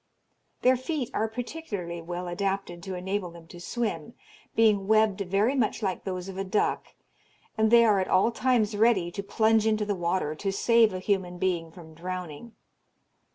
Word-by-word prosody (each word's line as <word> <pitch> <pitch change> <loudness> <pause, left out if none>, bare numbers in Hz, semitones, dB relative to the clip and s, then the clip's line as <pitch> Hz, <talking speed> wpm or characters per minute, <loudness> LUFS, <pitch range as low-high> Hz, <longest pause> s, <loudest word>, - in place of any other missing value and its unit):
Their 255 +1 +5
feet 260 -1 -3
are 220 - 0
particularly 220 - -5
well 175 +2 -5
adapted 195 -1 -3
to 190 +2 -5
enable 190 +1 -3
them 170 -1 -13
to 175 - -11
swim, 210 -2 -4 0.4
being 210 -3 +3
webbed 215 -2 +3
very 200 +6 +1
much 235 -4 0
like 190 -2 -2
those 185 -1 -4
of 190 0 -7
a - - 0
duck, 195 +2 -1 0.6
and 220 -1 +2
they 235 0 +7
are 210 -3 +4
at 185 - -1
all 195 +5 +3
times 230 -3 +1
ready 205 -5 +3
to 200 - -4
plunge 220 +2 +2
into 215 -1 +1
the 205 - 0
water 175 -3 -1
to 195 +5 -3
save 230 +2 +4
a 185 - -4
human 185 -2 -1
being 175 -3 -1
from 160 -2 -13
drowning. 180 +4 -7
195 Hz, 175 wpm, -27 LUFS, 180-220 Hz, 0.6 s, they